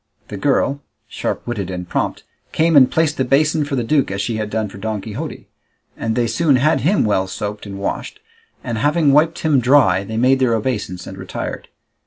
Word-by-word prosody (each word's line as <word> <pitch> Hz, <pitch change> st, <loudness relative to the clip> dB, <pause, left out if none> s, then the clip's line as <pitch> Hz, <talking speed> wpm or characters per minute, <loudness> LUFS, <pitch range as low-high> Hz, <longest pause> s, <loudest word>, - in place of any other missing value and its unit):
The 100 Hz, -, -6 dB
girl, 140 Hz, +3 st, +1 dB, 0.3 s
sharp -, -, -4 dB
witted 105 Hz, -6 st, -3 dB
and 90 Hz, -1 st, -5 dB
prompt, -, -, -2 dB, 0.3 s
came 165 Hz, 0 st, +2 dB
and 130 Hz, -3 st, +7 dB
placed 160 Hz, -2 st, +1 dB
the 130 Hz, -, +1 dB
basin 150 Hz, +4 st, +2 dB
for 145 Hz, -1 st, -3 dB
the 125 Hz, -, 0 dB
duke 140 Hz, +3 st, +1 dB
as 100 Hz, 0 st, -4 dB
she 110 Hz, +2 st, -2 dB
had 105 Hz, -1 st, -3 dB
done 110 Hz, 0 st, -1 dB
for 100 Hz, 0 st, -11 dB
Don 110 Hz, 0 st, -3 dB
Quixote, 120 Hz, +10 st, -7 dB, 0.5 s
and 110 Hz, 0 st, -2 dB
they 120 Hz, -, +1 dB
soon 145 Hz, +4 st, +2 dB
had 150 Hz, +5 st, +2 dB
him 190 Hz, -, +2 dB
well 95 Hz, -3 st, +1 dB
soaped 105 Hz, +2 st, -5 dB
and 100 Hz, -1 st, -7 dB
washed, 100 Hz, -, -4 dB, 0.4 s
and 115 Hz, -3 st, -3 dB
having 150 Hz, +2 st, +3 dB
wiped 160 Hz, +3 st, +3 dB
him 155 Hz, -4 st, +3 dB
dry 125 Hz, -7 st, +4 dB
they 110 Hz, +2 st, -5 dB
made 130 Hz, +3 st, +3 dB
their 125 Hz, -3 st, +2 dB
obeisance 105 Hz, -6 st, -3 dB
and 95 Hz, -, -9 dB
retired. 95 Hz, -, -6 dB
120 Hz, 205 wpm, -19 LUFS, 105-145 Hz, 0.5 s, and